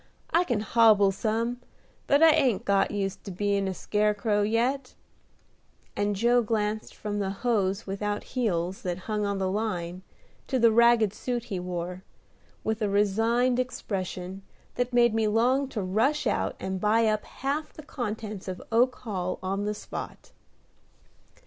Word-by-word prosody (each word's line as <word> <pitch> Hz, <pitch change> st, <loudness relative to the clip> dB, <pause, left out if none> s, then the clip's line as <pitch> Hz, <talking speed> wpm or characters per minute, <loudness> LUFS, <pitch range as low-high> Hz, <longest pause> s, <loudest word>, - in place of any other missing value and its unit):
I 345 Hz, +2 st, +3 dB
can 240 Hz, -8 st, 0 dB
hobble 215 Hz, -3 st, +5 dB
some, 230 Hz, +4 st, -2 dB, 0.5 s
but 285 Hz, +2 st, +4 dB
I 325 Hz, -, +9 dB
ain't 270 Hz, -10 st, +2 dB
got 200 Hz, -1 st, +3 dB
used 195 Hz, -2 st, -3 dB
to -, -, -6 dB
bein' 200 Hz, +1 st, 0 dB
a 190 Hz, -, -1 dB
scarecrow 210 Hz, +1 st, +1 dB
yet," 245 Hz, +5 st, 0 dB, 1.0 s
and 205 Hz, 0 st, 0 dB
Joe 240 Hz, +4 st, +3 dB
glanced 215 Hz, -1 st, -2 dB
from 205 Hz, -1 st, -4 dB
the 195 Hz, -1 st, -1 dB
hose 200 Hz, -1 st, 0 dB
without 205 Hz, +1 st, -3 dB
heels 190 Hz, -7 st, -1 dB
that 180 Hz, 0 st, -3 dB
hung 210 Hz, -2 st, -1 dB
on 200 Hz, -1 st, -1 dB
the 190 Hz, -1 st, 0 dB
line 185 Hz, -4 st, -3 dB, 0.5 s
to 265 Hz, -, 0 dB
the 230 Hz, -2 st, +5 dB
ragged 235 Hz, -2 st, +5 dB
suit 240 Hz, +1 st, -3 dB
he 200 Hz, -6 st, -4 dB
wore, 180 Hz, +1 st, -5 dB, 0.6 s
with 220 Hz, 0 st, -2 dB
a 210 Hz, -, +1 dB
resigned 225 Hz, +5 st, +2 dB
expression 190 Hz, -6 st, -4 dB, 0.3 s
that 245 Hz, 0 st, -1 dB
made 240 Hz, -2 st, +4 dB
me 220 Hz, -1 st, +1 dB
long 250 Hz, +6 st, +2 dB
to 215 Hz, -6 st, -3 dB
rush 225 Hz, +11 st, +1 dB
out -, -, 0 dB
and 190 Hz, -1 st, -4 dB
buy 225 Hz, +2 st, +3 dB
up 215 Hz, -1 st, +1 dB
half 285 Hz, +3 st, -3 dB
the 310 Hz, -, -12 dB
contents 215 Hz, -8 st, -5 dB
of 185 Hz, -1 st, -4 dB
Oak 245 Hz, +3 st, +3 dB
Hall 185 Hz, -5 st, -3 dB
on 195 Hz, +2 st, -2 dB
the 210 Hz, 0 st, -1 dB
spot. -, -, -8 dB
210 Hz, 155 wpm, -27 LUFS, 195-235 Hz, 1.0 s, I